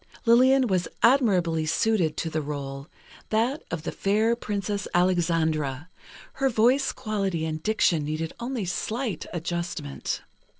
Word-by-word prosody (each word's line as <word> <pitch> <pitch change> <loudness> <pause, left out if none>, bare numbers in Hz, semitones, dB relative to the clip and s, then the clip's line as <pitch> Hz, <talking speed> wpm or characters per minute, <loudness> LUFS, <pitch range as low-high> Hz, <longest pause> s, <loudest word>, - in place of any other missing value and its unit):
Lillian 255 +3 +5
was 185 -6 0 0.2
admirably 185 - +3
suited 180 -2 +1
to 165 - -2
the 155 - -1
rôle, 140 -1 -5 0.4
that 235 +7 +1
of 165 -3 -4
the - - -3
fair 215 +4 +1
Princess 205 -3 -3
Alexandra, 165 -4 +1 0.4
her 270 0 +1
voice 245 +4 +3
quality 195 -9 -2
and 155 -1 -3
diction 175 -6 +2
needed 155 +2 -3
only 240 -3 -3
slight 215 - -3
adjustment. 170 -3 -4
180 Hz, 125 wpm, -26 LUFS, 160-225 Hz, 0.4 s, Lillian